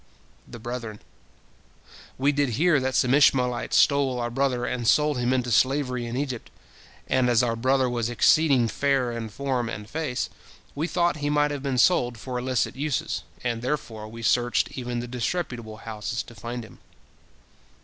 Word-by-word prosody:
The -, -, -9 dB
brethren: 115 Hz, -2 st, -6 dB, 1.2 s
"We 140 Hz, +2 st, +3 dB
did 145 Hz, -2 st, +1 dB
hear 165 Hz, -1 st, +4 dB
that 130 Hz, 0 st, -1 dB
some 125 Hz, 0 st, +3 dB
Ishmaelites 125 Hz, -4 st, +3 dB
stole 140 Hz, -3 st, +3 dB
our 120 Hz, 0 st, -2 dB
brother, 125 Hz, -1 st, 0 dB
and 120 Hz, -2 st, -2 dB
sold 150 Hz, 0 st, +3 dB
him 120 Hz, +1 st, +1 dB
into 125 Hz, -2 st, 0 dB
slavery 125 Hz, 0 st, +1 dB
in 120 Hz, +2 st, -4 dB
Egypt, 130 Hz, -4 st, -4 dB, 0.6 s
and 130 Hz, -1 st, +2 dB
as 120 Hz, 0 st, +4 dB
our 115 Hz, -1 st, 0 dB
brother 130 Hz, +2 st, +2 dB
was 120 Hz, -2 st, -1 dB
exceeding 130 Hz, 0 st, +4 dB
fair 135 Hz, 0 st, +1 dB
in 115 Hz, -1 st, -5 dB
form 125 Hz, +1 st, -2 dB
and 105 Hz, +1 st, -6 dB
face, 145 Hz, -1 st, -2 dB, 0.5 s
we 155 Hz, +4 st, -2 dB
thought 175 Hz, -2 st, +1 dB
he 145 Hz, 0 st, -2 dB
might 145 Hz, 0 st, +2 dB
have 145 Hz, -2 st, -4 dB
been 135 Hz, -2 st, -1 dB
sold 125 Hz, -6 st, +3 dB
for 125 Hz, +2 st, -4 dB
illicit 130 Hz, -1 st, -1 dB
uses, 145 Hz, 0 st, -2 dB, 0.2 s
and 120 Hz, -2 st, -1 dB
therefore 120 Hz, -5 st, -3 dB
we 115 Hz, +1 st, -9 dB
searched 120 Hz, +2 st, +2 dB
even 120 Hz, -2 st, -3 dB
the 120 Hz, -, -6 dB
disreputable 120 Hz, -3 st, -3 dB
houses 110 Hz, 0 st, -4 dB
to 120 Hz, -, -14 dB
find 120 Hz, +2 st, -6 dB
him." -, -, -16 dB
125 Hz, 170 wpm, -25 LUFS, 120-140 Hz, 1.2 s, hear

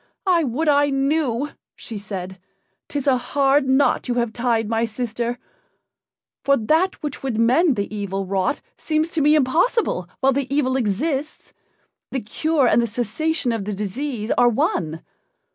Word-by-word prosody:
"I 350 Hz, -3 st, +3 dB
would 285 Hz, +4 st, -1 dB
I 290 Hz, 0 st, +4 dB
knew!" 275 Hz, -1 st, 0 dB, 0.3 s
she 220 Hz, -3 st, -7 dB
said. 190 Hz, -2 st, -6 dB, 0.5 s
"'Tis 285 Hz, -2 st, -3 dB
a 265 Hz, -3 st, +4 dB
hard 270 Hz, +2 st, +2 dB
knot 265 Hz, +1 st, +2 dB
you 245 Hz, -, -1 dB
have 235 Hz, -2 st, 0 dB
tied, 235 Hz, -2 st, 0 dB
my 225 Hz, +1 st, 0 dB
sister. 235 Hz, +1 st, -3 dB, 1.1 s
For 275 Hz, 0 st, +4 dB
that 320 Hz, -, +1 dB
which 295 Hz, -3 st, -4 dB
would 260 Hz, -5 st, -2 dB
mend 255 Hz, +7 st, +4 dB
the 200 Hz, +1 st, -3 dB
evil 195 Hz, -1 st, -3 dB
wrought 190 Hz, +7 st, -1 dB
seems 310 Hz, +1 st, -1 dB
to 325 Hz, -, -1 dB
me 300 Hz, +2 st, +5 dB
impossible 305 Hz, -, +1 dB
while 270 Hz, 0 st, +3 dB
the 275 Hz, 0 st, -2 dB
evil 270 Hz, -2 st, +1 dB
exists 265 Hz, +6 st, -2 dB, 0.6 s
the 265 Hz, -, -1 dB
cure 285 Hz, +5 st, +1 dB
and 240 Hz, -, +4 dB
the 235 Hz, -, 0 dB
cessation 245 Hz, +6 st, -1 dB
of 225 Hz, -4 st, -3 dB
the 210 Hz, -1 st, -3 dB
disease 220 Hz, +3 st, -3 dB
are 245 Hz, -, +6 dB
one. 165 Hz, -7 st, -1 dB
255 Hz, 160 wpm, -22 LUFS, 220-290 Hz, 1.1 s, are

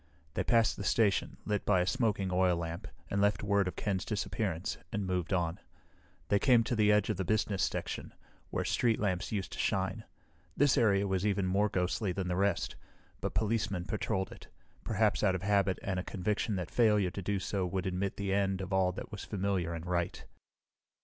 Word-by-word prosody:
They -, -, 0 dB
passed 115 Hz, -2 st, +3 dB
the 100 Hz, -, -4 dB
station, 105 Hz, -1 st, +2 dB
lit 105 Hz, -1 st, 0 dB
by 95 Hz, -3 st, +3 dB
a -, -, +1 dB
smoking 105 Hz, -5 st, 0 dB
oil 90 Hz, -1 st, +3 dB
lamp, 85 Hz, 0 st, -4 dB, 0.2 s
and 100 Hz, -, +1 dB
left 105 Hz, +1 st, +2 dB
word 100 Hz, -2 st, +2 dB
of 90 Hz, -, -4 dB
Ken's 95 Hz, -3 st, -1 dB
disappearance, 100 Hz, -4 st, -2 dB
and 105 Hz, -2 st, -2 dB
moved 90 Hz, -1 st, -1 dB
on. 85 Hz, -3 st, 0 dB, 0.7 s
They 100 Hz, -, +4 dB
came 120 Hz, -1 st, +5 dB
to 120 Hz, -, -1 dB
the 105 Hz, -1 st, +4 dB
edge 105 Hz, +1 st, +3 dB
of 105 Hz, -, -3 dB
the 95 Hz, -, -1 dB
business 105 Hz, 0 st, 0 dB
section, -, -, -2 dB, 0.4 s
where -, -, -2 dB
street 115 Hz, -2 st, +2 dB
lamps 95 Hz, -4 st, -1 dB
used 100 Hz, -3 st, -2 dB
to -, -, -7 dB
shine. -, -, 0 dB, 0.5 s
This 145 Hz, -2 st, +4 dB
area 100 Hz, -5 st, +3 dB
was 95 Hz, -1 st, 0 dB
even 100 Hz, -2 st, +1 dB
more 100 Hz, +3 st, +2 dB
ghostly 95 Hz, +2 st, 0 dB
than 90 Hz, 0 st, -3 dB
the 90 Hz, -, 0 dB
rest, 100 Hz, -1 st, 0 dB, 0.4 s
but -, -, -3 dB
policemen 105 Hz, -5 st, 0 dB
patrolled 100 Hz, -2 st, -2 dB
it, -, -, -12 dB, 0.4 s
perhaps -, -, +1 dB
out 95 Hz, -, +3 dB
of 90 Hz, -, -4 dB
habit 100 Hz, -2 st, +2 dB
and 95 Hz, -2 st, -1 dB
a -, -, -3 dB
conviction 105 Hz, +3 st, -1 dB
that 90 Hz, -3 st, -4 dB
failure 105 Hz, -6 st, +3 dB
to 100 Hz, -, -5 dB
do 100 Hz, +2 st, -1 dB
so 95 Hz, 0 st, -1 dB
would 90 Hz, +1 st, -2 dB
admit 95 Hz, +1 st, -2 dB
the 100 Hz, -2 st, -1 dB
end 95 Hz, -1 st, +1 dB
of 95 Hz, 0 st, -4 dB
all 95 Hz, -1 st, +3 dB
that -, -, -7 dB
was 105 Hz, -, -6 dB
familiar 95 Hz, -4 st, -1 dB
and 85 Hz, 0 st, -5 dB
right. 85 Hz, -1 st, -2 dB
100 Hz, 200 wpm, -32 LUFS, 90-105 Hz, 0.7 s, came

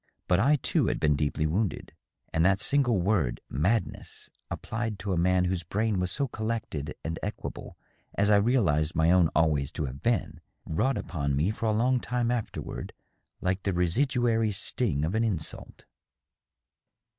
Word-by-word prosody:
But 90 Hz, -, +3 dB
I 140 Hz, +8 st, +4 dB
too 140 Hz, -, +1 dB
had -, -, 0 dB
been 75 Hz, -1 st, +3 dB
deeply 75 Hz, +1 st, 0 dB
wounded, 90 Hz, +3 st, -1 dB, 0.4 s
and 80 Hz, -, +2 dB
that 95 Hz, +2 st, +4 dB
single 120 Hz, -1 st, +2 dB
word 90 Hz, -, +1 dB
" -, -, -51 dB, 0.2 s
madness," 115 Hz, +1 st, -2 dB, 0.2 s
applied 110 Hz, -2 st, -3 dB
to 95 Hz, +1 st, -3 dB
a -, -, +1 dB
man 90 Hz, +2 st, +3 dB
whose 90 Hz, -1 st, 0 dB
brain 105 Hz, +4 st, -1 dB
was 90 Hz, 0 st, 0 dB
so 140 Hz, +8 st, 0 dB
collected 110 Hz, -, -4 dB
and 80 Hz, 0 st, -3 dB
equable -, -, -6 dB, 0.4 s
as 100 Hz, +1 st, +3 dB
I 105 Hz, -, +7 dB
realized 100 Hz, -, +2 dB
my 80 Hz, +1 st, +4 dB
own 90 Hz, -3 st, +5 dB
always 75 Hz, -3 st, +2 dB
to 75 Hz, -, -2 dB
have 65 Hz, +1 st, -7 dB
been, 115 Hz, -6 st, -1 dB, 0.2 s
wrought 110 Hz, +11 st, 0 dB
upon 70 Hz, -8 st, -2 dB
me 80 Hz, +9 st, +1 dB
for 115 Hz, +1 st, -3 dB
a -, -, +3 dB
long 125 Hz, +4 st, +2 dB
time 120 Hz, 0 st, -1 dB
afterward 120 Hz, -3 st, -4 dB, 0.5 s
like 95 Hz, +1 st, 0 dB
the 95 Hz, -, -1 dB
residuary 115 Hz, -, +2 dB
sting 95 Hz, -, 0 dB
of 85 Hz, -, -2 dB
an 110 Hz, +1 st, +2 dB
insult. 95 Hz, -9 st, -4 dB
95 Hz, 170 wpm, -28 LUFS, 80-115 Hz, 0.5 s, I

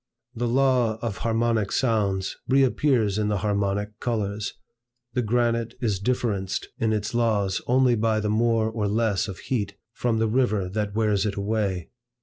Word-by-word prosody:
The 120 Hz, -1 st, -2 dB
law 125 Hz, -3 st, +2 dB
of 115 Hz, -4 st, -2 dB
harmonic 115 Hz, -2 st, 0 dB
sounds 100 Hz, -6 st, 0 dB
reappears 130 Hz, -5 st, +2 dB
in 105 Hz, -, +1 dB
the 105 Hz, -1 st, +1 dB
harmonic 100 Hz, +1 st, -1 dB
colors. 105 Hz, -4 st, -2 dB, 0.6 s
The 125 Hz, -, +1 dB
granite 115 Hz, 0 st, 0 dB
is 105 Hz, -6 st, 0 dB
differenced 100 Hz, -4 st, -1 dB
in 110 Hz, -1 st, +1 dB
its 105 Hz, 0 st, -1 dB
laws 105 Hz, -5 st, +1 dB
only 125 Hz, 0 st, +4 dB
by 110 Hz, -1 st, +1 dB
the 105 Hz, -, -1 dB
more 110 Hz, +1 st, +2 dB
or 110 Hz, -2 st, -1 dB
less 105 Hz, -2 st, +1 dB
of 95 Hz, -3 st, -6 dB
heat, 100 Hz, -6 st, -3 dB, 0.2 s
from 115 Hz, -1 st, 0 dB
the 110 Hz, 0 st, +2 dB
river 110 Hz, -5 st, +1 dB
that 105 Hz, +1 st, -3 dB
wears 105 Hz, -2 st, +2 dB
it 105 Hz, -, -2 dB
away. 100 Hz, -4 st, -2 dB
110 Hz, 155 wpm, -25 LUFS, 100-120 Hz, 0.6 s, only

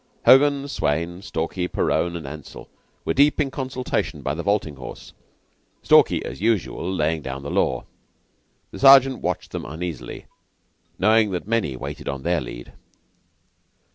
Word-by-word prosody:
Hogan, 140 Hz, +1 st, +5 dB
Swayne, 85 Hz, -, -2 dB
Stalky, 90 Hz, -1 st, -3 dB
Perowne, 85 Hz, -1 st, 0 dB
and 80 Hz, -4 st, -6 dB
Ansell 75 Hz, +1 st, -9 dB, 0.4 s
were -, -, 0 dB
deep 145 Hz, +3 st, +3 dB
in 140 Hz, -3 st, +1 dB
consultation 130 Hz, -2 st, -3 dB
by 70 Hz, -, -1 dB
the 80 Hz, -, -4 dB
vaulting 95 Hz, -7 st, -1 dB
horse, 65 Hz, -, -10 dB, 0.7 s
Stalky -, -, +4 dB
as -, -, -7 dB
usual 105 Hz, -4 st, 0 dB
laying 80 Hz, -3 st, 0 dB
down 65 Hz, 0 st, -6 dB
the 70 Hz, -, -5 dB
law. -, -, 0 dB, 0.9 s
The 95 Hz, -, -9 dB
Sergeant 135 Hz, +1 st, +7 dB
watched 90 Hz, +1 st, -3 dB
them -, -, -5 dB
uneasily, 80 Hz, -2 st, -6 dB, 0.7 s
knowing 110 Hz, 0 st, +4 dB
that 90 Hz, 0 st, -4 dB
many 110 Hz, -, 0 dB
waited 60 Hz, -, -6 dB
on 70 Hz, -1 st, -5 dB
their 85 Hz, -2 st, +1 dB
lead. -, -, -9 dB
90 Hz, 140 wpm, -23 LUFS, 75-115 Hz, 0.9 s, Sergeant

